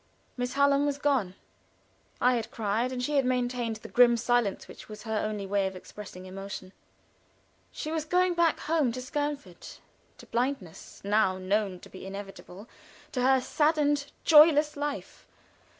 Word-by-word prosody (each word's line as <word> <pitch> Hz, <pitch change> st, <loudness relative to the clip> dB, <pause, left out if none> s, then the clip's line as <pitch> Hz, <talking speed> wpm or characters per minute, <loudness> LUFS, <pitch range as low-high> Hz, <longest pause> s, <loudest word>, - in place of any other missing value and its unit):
Miss 245 Hz, 0 st, -3 dB
Hallam 280 Hz, +1 st, +3 dB
was 285 Hz, -1 st, -1 dB
gone. 265 Hz, -11 st, 0 dB, 0.8 s
I 250 Hz, +1 st, +4 dB
had 230 Hz, -3 st, -2 dB
cried, 225 Hz, +3 st, -1 dB
and 250 Hz, -1 st, -3 dB
she 295 Hz, +3 st, 0 dB
had 275 Hz, -, +4 dB
maintained 245 Hz, -2 st, -1 dB
the 215 Hz, -, -10 dB
grim 240 Hz, -1 st, +5 dB
silence 240 Hz, -3 st, 0 dB
which -, -, -12 dB
was 215 Hz, 0 st, -9 dB
her 220 Hz, -2 st, -1 dB
only 210 Hz, -2 st, -3 dB
way 195 Hz, 0 st, +1 dB
of 190 Hz, -, -6 dB
expressing 185 Hz, 0 st, -10 dB
emotion. 190 Hz, 0 st, -8 dB, 1.0 s
She 310 Hz, -, -5 dB
was 320 Hz, -1 st, -1 dB
going 360 Hz, +3 st, +2 dB
back 340 Hz, -2 st, +2 dB
home 305 Hz, -5 st, +1 dB
to 255 Hz, -, -5 dB
Skernford, 280 Hz, -, -5 dB, 0.4 s
to -, -, -13 dB
blindness, 235 Hz, -8 st, -3 dB
now 200 Hz, -2 st, +2 dB
known 190 Hz, 0 st, -1 dB
to -, -, -13 dB
be 190 Hz, 0 st, -10 dB
inevitable, 195 Hz, +1 st, -9 dB, 0.4 s
to 250 Hz, -, -2 dB
her 265 Hz, +1 st, +4 dB
saddened, 295 Hz, 0 st, +1 dB
joyless 300 Hz, -1 st, +6 dB
life. 290 Hz, 0 st, -5 dB
245 Hz, 155 wpm, -28 LUFS, 205-285 Hz, 1.0 s, joyless